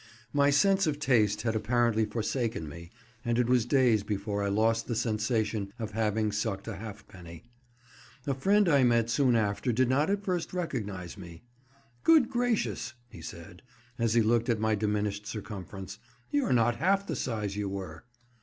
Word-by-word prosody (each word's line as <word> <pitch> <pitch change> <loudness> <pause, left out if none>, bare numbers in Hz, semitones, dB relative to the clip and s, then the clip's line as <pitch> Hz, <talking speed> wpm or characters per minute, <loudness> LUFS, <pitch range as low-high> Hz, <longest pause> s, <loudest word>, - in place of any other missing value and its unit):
My 140 0 +4
sense 190 +6 +3
of 150 -2 0
taste 110 -7 +2
had 115 -1 0
apparently 110 0 +2
forsaken 115 - -2
me, 85 +3 -10 0.3
and 120 -1 0
it 125 - +3
was 125 -2 +2
days 125 -5 +3
before 100 0 -3
I 100 - 0
lost 115 +2 +1
the 120 - -2
sensation 110 -2 -1
of 110 -2 -5
having 110 0 0
sucked 105 -1 -3
a - - -5
halfpenny. 95 -6 -10 0.8
A 140 - 0
friend 200 +9 +3
I 145 -4 +4
met 115 -1 +3
soon 125 0 +3
after 110 +3 0
did 125 +2 +2
not 145 +6 +2
at 200 0 0
first 180 -3 -2
recognise 105 - -4
me. 85 -2 -11 0.6
"Good 315 -7 +5
gracious!" 240 - -1
he 85 - -12
said, 85 +2 -10 0.4
as 115 -1 +1
he 115 - +5
looked 115 +2 +2
at 115 -2 +1
my 110 0 +1
diminished 105 -1 -1
circumference, 100 -2 -7 0.3
"you're 290 -2 +1
not 120 -1 +3
half 195 +3 +2
the - - -3
size 105 -5 -3
you 105 -1 -2
were." 95 -2 -7
110 Hz, 170 wpm, -29 LUFS, 105-130 Hz, 0.8 s, Good